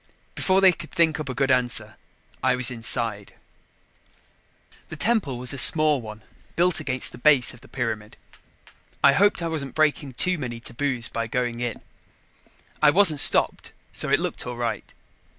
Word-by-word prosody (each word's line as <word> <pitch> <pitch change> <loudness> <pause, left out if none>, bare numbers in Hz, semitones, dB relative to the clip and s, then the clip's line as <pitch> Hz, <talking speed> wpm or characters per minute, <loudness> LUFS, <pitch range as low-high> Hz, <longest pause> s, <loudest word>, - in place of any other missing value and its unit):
Before 190 0 0
they 190 -1 +6
could 175 - -11
think 165 -3 0
up 150 -3 -6
a 130 - -5
good 135 +1 0
answer, 125 -1 0 0.5
I 125 0 +1
was 125 0 +1
inside. 115 -3 -1 1.5
The - - -8
temple 170 - -2
was 125 +2 -3
a 140 - -2
small 155 -1 +6
one 110 -1 -11 0.3
built 175 +1 +1
against 130 -2 -3
the - - -13
base 135 -3 +3
of 120 - -17
the - - -18
pyramid. 110 -4 -6 0.9
I 140 - +5
hoped 200 +2 +1
I - - -2
wasn't 150 -5 -6
breaking 150 -3 -1
too 180 +7 +1
many 120 -4 -7
taboos 120 0 -4
by 115 -1 -5
going 120 0 -4
in. 120 -2 -5 1.0
I 150 - +5
wasn't 165 -3 +5
stopped, - - +3 0.2
so - - -3
it - - +2
looked - - -4
all 125 -1 -7
right. 115 -3 -5
130 Hz, 170 wpm, -23 LUFS, 120-155 Hz, 1.5 s, they